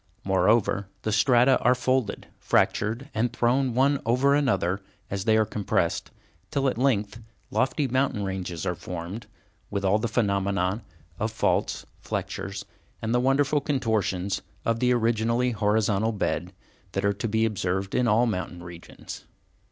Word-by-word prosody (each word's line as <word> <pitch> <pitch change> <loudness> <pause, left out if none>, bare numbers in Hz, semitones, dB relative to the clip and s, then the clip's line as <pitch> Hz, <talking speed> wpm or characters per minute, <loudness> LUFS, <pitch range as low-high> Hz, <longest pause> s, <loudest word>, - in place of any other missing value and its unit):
Moreover, 100 0 +2 0.2
the 110 - -1
strata 125 +4 +4
are 125 +1 +4
folded, 125 -2 0
fractured, 115 +7 +1
and 115 +2 0
thrown 125 +1 +1
one 140 +2 +3
over 130 +5 +3
another 100 -10 +1 0.3
as 95 -1 -3
they 110 -1 +4
are 110 - +3
compressed, 105 -1 -1 0.4
till 140 -1 0
at 130 - +1
length 115 -5 +1 0.3
lofty 135 +2 +1
mountain 130 -4 0
ranges 95 -4 -4
are 90 - 0
formed, 90 +5 -7 0.4
with 100 -1 -2
all 100 +3 +3
the 120 - -1
phenomena 100 -2 0 0.4
of 110 +1 -1
faults, 100 -3 0 0.2
flexures, - - -4 0.3
and 110 +1 -2
the 125 - +3
wonderful 140 +3 +2
contortions 110 - 0 0.2
of 115 0 +1
the 125 0 +3
originally 115 +1 +2
horizontal 105 0 +1
beds, 90 -3 -2 0.4
that 95 +1 -1
are 100 - +3
to 110 +3 -3
be 110 +1 +2
observed 95 -2 -2
in 125 -1 +2
all 115 +3 +4
mountain 90 -5 -3
regions. 85 -1 -10
110 Hz, 145 wpm, -26 LUFS, 100-125 Hz, 0.4 s, strata